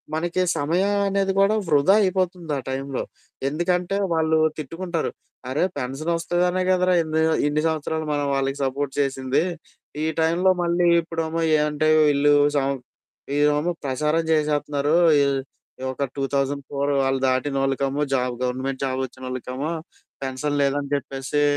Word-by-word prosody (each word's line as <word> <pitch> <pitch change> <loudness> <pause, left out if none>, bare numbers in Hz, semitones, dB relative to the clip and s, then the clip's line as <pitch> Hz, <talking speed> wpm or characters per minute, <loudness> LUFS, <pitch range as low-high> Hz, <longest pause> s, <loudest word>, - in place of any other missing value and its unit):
మనకి 175 +3 -1 0.2
సమయం 175 +8 +1 0.2
అనేది 195 0 +1
కూడా 205 +2 +4
వృధా 150 +5 +4
అయిపోతుంది 185 -4 -1
ఆ - - -2
టైంలో. 135 0 -3 0.5
ఎందుకంటే 180 +4 0 0.2
వాళ్ళు 160 0 +2 0.2
తిట్టుకుంటారు. 165 +3 -3 0.4
అరే! 145 +6 0
పెన్షన్ 135 +5 -3
వస్తదనే 175 +2 0
కదరా! 185 0 +3
ఎన్ని 160 0 0 0.3
ఇన్ని 150 +1 0
సంవత్సరాలు 160 0 -2
మనం 145 0 0
వాళ్ళకి 135 0 -1
సపోర్ట్ 135 +1 -2
చేసింది. 135 +1 +1 0.6
ఈ - - +1 0.2
టైంలో 175 +4 +3
మళ్ళీ 175 0 +2
ఇప్పుడమో 165 0 -3 0.2
ఏమంటే 150 +1 +1 0.2
వీళ్ళు 145 0 +4 0.2
సం 135 0 +1 0.6
వీళ్లేమో 150 +3 +2
ప్రసారం 150 +5 0
చేసేస్తున్నారు. 150 -1 +1 0.3
ఈ - - +4 0.7
ఒక 135 - -3
2004 140 +1 -1
వాళ్ళు 135 0 +1
దాటిన 130 +2 0
వాళ్ళకమో 135 +1 0
జాబ్ 125 -1 0
గవర్నమెంట్ 130 +2 -2
జాబ్ 130 0 -2
వచ్చినోళ్ళకమో 130 +3 -5 0.5
పెన్షన్ 145 +2 -2
లేదని 140 0 0
చెప్పేసి, 135 +2 -2
145 Hz, 125 wpm, -23 LUFS, 135-165 Hz, 0.7 s, కూడా